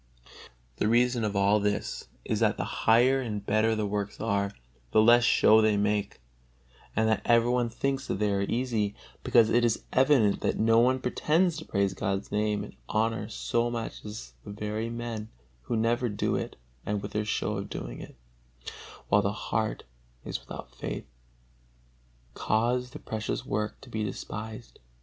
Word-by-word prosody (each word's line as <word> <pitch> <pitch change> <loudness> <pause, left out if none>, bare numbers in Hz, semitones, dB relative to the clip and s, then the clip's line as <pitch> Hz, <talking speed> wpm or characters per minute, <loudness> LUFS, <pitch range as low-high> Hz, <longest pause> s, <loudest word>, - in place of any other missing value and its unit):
The - - +1
reason 120 +1 +3
of 105 -1 -1
all 100 +2 +4
this 105 0 -2 0.2
is - - -1
that - - +2
the - - -1
higher 125 +4 +3
and 105 -5 -4
better 110 +2 +2
the 110 -1 -1
works 100 0 -3
are, 100 -2 0 0.4
the 110 - +4
less 120 +2 +6
show 110 -1 +6
they 110 -1 +3
make; 105 0 0 0.8
and 110 +1 +2
that 110 - +2
every 120 0 +4
one 125 -1 +1
thinks 135 +3 -2
they 105 +1 0
are 100 - 0
easy, 110 -1 -1 0.3
because 115 -2 +4
it 120 - +4
is 115 -2 +1
evident 130 -6 +4
that - - 0
no 115 +1 +4
one 130 +2 +3
pretends 160 +7 +1
to 160 - -7
praise 100 -1 0
God's 95 0 -2
Name 105 0 0
and - - -10
honor 110 0 0
so 120 +2 0
much 115 -1 -5
as 105 - -8
the - - -10
very 105 +2 -3
men 115 -2 -5 0.4
who 115 - -1
never 120 +2 +1
do 105 - -1
it - - -3 0.3
and 105 0 -1
with - - -5
their 105 - -1
show 105 0 -1
of 100 +1 -5
doing - - -6
it, - - -11 0.9
while 105 +1 +5
the 100 - 0 0.2
heart 110 -1 -1 0.4
is - - -3
without - - -10
faith, - - -5 1.3
cause 120 +3 0
the 145 - -9
precious 110 -6 -4
work 105 +1 -2
to 135 - -13
be 110 -1 -2
despised. 110 +2 -6
110 Hz, 170 wpm, -28 LUFS, 105-120 Hz, 1.3 s, less